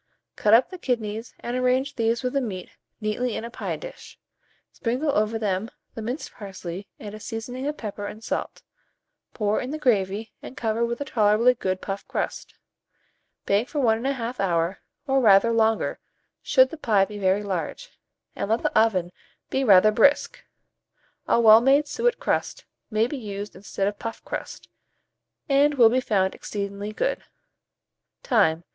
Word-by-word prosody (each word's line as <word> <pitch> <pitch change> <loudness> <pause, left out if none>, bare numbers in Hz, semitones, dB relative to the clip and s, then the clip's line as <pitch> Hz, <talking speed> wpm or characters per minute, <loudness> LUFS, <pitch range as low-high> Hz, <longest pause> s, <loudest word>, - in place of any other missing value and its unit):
Cut 215 +1 +5
up 250 +9 +3
the 370 - -8
kidneys, 225 -4 -3
and 240 +1 -3
arrange 255 +2 +1
these 230 +1 0
with 250 - -1
the 275 - +1
meat 190 -7 -5 0.3
neatly 220 +2 -1
in 225 - -4
a 235 - -8
pie - - -4
dish; - - -11 0.5
sprinkle 255 +6 -1
over 215 -1 +1
them 205 0 -1 0.2
the 225 - -6
minced 245 +7 -4
parsley 190 -2 -7
and 210 -1 -8
a 215 - -8
seasoning 245 +5 -5
of 295 0 -3
pepper 205 -2 -5
and 215 +2 -9
salt; - - -4 0.7
pour 210 -1 0
in 250 - -5
the 305 - -3
gravy, 215 -5 0
and 260 - -10
cover 225 0 0
with 235 +2 -2
a - - -2
tolerably 225 0 +3
good 185 -5 -3
puff 195 0 -5
crust. - - -4 0.9
Bake 205 +6 +1
for 300 - -2
1 225 -4 +2
1/2 255 -2 -3
hour, 170 -1 0 0.3
or 270 -1 +2
rather 210 0 +6
longer, 225 -1 +1 0.4
should 260 -2 +4
the 325 - -7
pie 210 -9 +3
be 210 +1 -8
very 195 +1 +2
large, 200 - -4 0.4
and - - -3
let 225 +2 +1
the - - -1
oven 195 -6 +3 0.4
be 270 - +1
rather 210 -2 +6
brisk. 280 +7 +3 0.8
A - - +3
well 220 -1 +8
made 280 +4 +4
suet 475 +9 0
crust - - -2 0.2
may 220 0 +2
be 275 +4 -4
used 205 -2 -6
instead 195 +1 -3
of 205 0 -3
puff 230 -1 -6
crust, - - -6 0.8
and 285 +1 +3
will 235 -4 +7
be 255 +3 +1
found 190 -6 +1
exceedingly 200 0 -5
good. - - -2 1.0
Time. 175 - +2
225 Hz, 165 wpm, -25 LUFS, 205-255 Hz, 1.0 s, well